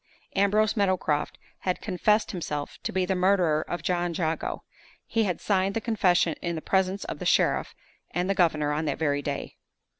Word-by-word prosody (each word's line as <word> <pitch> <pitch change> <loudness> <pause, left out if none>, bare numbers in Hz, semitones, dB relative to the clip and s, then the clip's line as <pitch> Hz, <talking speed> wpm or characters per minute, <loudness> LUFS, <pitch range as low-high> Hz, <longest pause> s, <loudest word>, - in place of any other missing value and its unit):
Ambrose 205 +2 +3
Meadowcroft 185 -7 0 0.2
had 185 -1 -1
confessed 210 +2 +1
himself 150 -6 -4
to - - -3
be 185 0 +1
the 190 - 0
murderer 180 -4 +3
of 175 - -4
John 175 -1 0
Jago! 160 -1 -2 0.4
He 225 -1 +1
had 180 -3 -1
signed 195 -1 +1
the - - +1
confession 190 -7 +2
in 170 -1 -2
the - - -3
presence 190 +1 +1
of - - -6
the - - -5
sheriff - - +2 0.3
and 180 +1 -1
the 195 - +2
governor 155 -6 +2
on 155 +2 -1
that 145 -3 -1
very 145 -2 0
day. 140 0 -5
180 Hz, 180 wpm, -27 LUFS, 160-195 Hz, 0.4 s, Ambrose